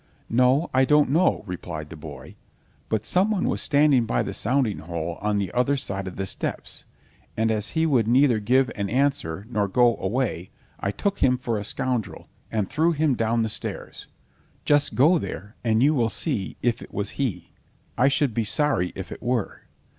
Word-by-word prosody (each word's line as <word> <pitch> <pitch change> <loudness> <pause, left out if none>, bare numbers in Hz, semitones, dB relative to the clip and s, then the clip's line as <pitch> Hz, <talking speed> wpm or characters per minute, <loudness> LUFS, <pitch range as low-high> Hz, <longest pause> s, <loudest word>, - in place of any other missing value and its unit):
"No, 130 +7 +3
I 130 0 +4
don't 150 0 +4
know," 170 +5 +2
replied 85 -4 -6
the - - -7
boy, 75 -4 -10 0.5
"but 110 -1 -1
someone 190 - +1
was - - -1
standing 145 -5 +3
by - - +1
the - - -4
sounding 125 -2 0
hole 85 0 -5
on 105 0 0
the 100 -3 -2
other 125 +3 +1
side 95 -6 -4
of 90 - -7
the 95 - -3
steps, - - -3 0.5
and 110 0 +2
as 105 -1 0
he 160 - +3
would 125 -8 +2
neither 125 -1 +4
give 125 +4 +2
an 100 -2 -2
answer 125 - 0
nor 105 -4 0
go 120 +4 +3
away, 95 -4 -2 0.3
I 100 - -1
took 195 - -2
him 125 -1 +3
for 120 -3 -2
a - - -5
scoundrel, 125 +1 -3 0.2
and 105 -4 0
threw 160 +4 +1
him 155 -2 +2
down 115 -1 +1
stairs; - - -6 0.6
just 145 -1 +2
go 160 +7 +5
there 105 -3 -7
and 115 0 +2
you 150 +2 +4
will 120 -6 +1
see 115 - -3
if 120 -1 +1
it - - -11
was 100 0 -2
he, 125 -8 -3 0.4
I 125 - +4
should 140 -2 +1
be 115 - 0
sorry 120 -5 +1
if 95 -1 -7
it - - -8
were." 120 -3 -2
120 Hz, 185 wpm, -24 LUFS, 100-140 Hz, 0.6 s, go